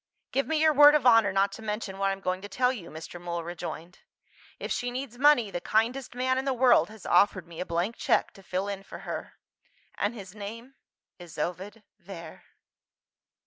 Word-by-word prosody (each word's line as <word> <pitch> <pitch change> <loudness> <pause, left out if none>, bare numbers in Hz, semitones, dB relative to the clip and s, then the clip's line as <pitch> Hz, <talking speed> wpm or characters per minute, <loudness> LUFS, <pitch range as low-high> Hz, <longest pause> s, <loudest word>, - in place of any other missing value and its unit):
"Give 275 +1 0
me 320 -1 +1
your 310 0 +4
word 295 +1 +8
of 295 - +1
honour 225 -4 +6
not 195 +1 +2
to 225 - -9
mention 210 -2 -4
what 195 0 +2
I - - +1
am 195 - -9
going 185 0 -2
to 205 - -8
tell 250 +2 +1
you," 185 -9 -8
Mr. 160 +2 -9
Mool 170 -1 -4
rejoined. 175 0 -7 0.6
"If - - -6
she 245 - -1
needs 245 -1 -6
money, 275 -7 +5
the 175 - -4
kindest 240 +4 0
man 260 +1 +1
in 265 - -4
the 270 -2 0
world 250 -2 +4
has 220 -1 -13
offered 185 -3 +3
me 170 -1 -11
a 180 - -4
blank 175 +7 -1
cheque - - +1
to 195 - -15
fill 185 +1 -3
in 200 -1 -4
for 195 - -10
her - - -5 0.6
and 205 +4 -2
his 195 -4 -9
name 225 +5 -8 0.5
is 175 -2 -12
Ovid 190 +7 -4 0.2
Vere." 170 -4 -10
205 Hz, 205 wpm, -28 LUFS, 185-250 Hz, 0.6 s, word